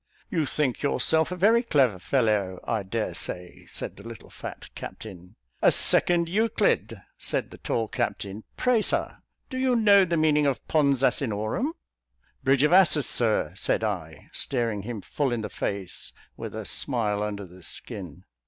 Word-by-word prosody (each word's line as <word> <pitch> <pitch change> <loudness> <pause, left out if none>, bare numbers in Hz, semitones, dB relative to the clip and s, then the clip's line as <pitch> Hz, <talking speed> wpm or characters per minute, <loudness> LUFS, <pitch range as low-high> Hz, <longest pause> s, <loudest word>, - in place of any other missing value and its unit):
"You 160 -4 0
think 135 -4 -1
yourself 160 +3 +2
a - - -2
very 220 +6 +4
clever 135 - +2
fellow, 105 -6 +1
I 110 -2 -1
dare 105 +3 -3
say," 90 0 -5
said - - -5
the - - -11
little 115 -2 -11
fat - - -9
captain. 90 -4 -9 0.3
"A - - +6
second 170 -1 +4
Euclid!" 220 +6 +1 0.2
said - - -2
the - - -12
tall 115 -1 -1
captain. 110 -4 -3
"Pray, 250 -3 +3
Sir, - - -1 0.3
do 255 - -3
you 260 -1 +2
know 205 -4 +6
the 170 -2 0
meaning 150 -2 +3
of 130 -5 -2
'Pons 140 -4 +2
Asinorum?'" 120 - 0 0.7
"Bridge 135 +1 +3
of 150 - +4
Asses, 160 -6 +5
Sir," 115 -3 +2
said - - 0
I, - - -4
staring 115 -6 -1
him 110 0 -6
full 140 +6 -1
in 120 -2 -1
the 105 - -4
face, 100 -3 -4 0.2
with - - -7
a - - -5
smile 105 -6 0
under 100 -1 -3
the 90 +1 -15
skin. 90 - -9
125 Hz, 160 wpm, -26 LUFS, 105-160 Hz, 0.7 s, A